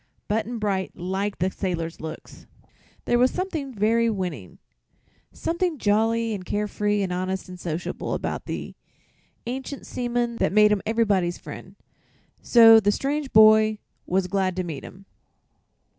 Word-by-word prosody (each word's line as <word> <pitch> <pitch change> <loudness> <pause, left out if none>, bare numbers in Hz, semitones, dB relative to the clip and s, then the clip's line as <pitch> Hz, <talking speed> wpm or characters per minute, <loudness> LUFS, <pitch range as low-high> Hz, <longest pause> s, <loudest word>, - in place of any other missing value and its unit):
Button 220 +3 -1
Bright 200 -3 -2
liked 190 +3 -3
the 185 +2 0
sailor's 170 -4 -4
looks. 160 0 -9 0.6
There 240 - +2
was 250 +1 +5
something 325 -7 -4
very 230 +1 +2
winning 175 - -4 0.7
something 340 -1 -2
jolly 225 +1 +1
and 195 -3 -5
care 210 +3 -2
free 205 0 0
and 180 -2 -2
honest 185 +1 -3
and 180 -1 -10
sociable 170 0 -4
about - - -4
the - - -5 0.7
ancient 265 +3 -5
seaman 240 -1 -2
that - - 0
made 210 0 +6
him 210 -2 +1
everybody's 205 -6 +1
friend; - - -10 0.7
so 225 -2 +8
the 205 -1 +2
strange 280 +4 -2
boy 215 0 +6 0.3
was 190 +1 +1
glad 185 0 -1
to 185 - -1
meet 160 -5 -6
him. 195 +2 -12
210 Hz, 145 wpm, -24 LUFS, 185-230 Hz, 0.7 s, so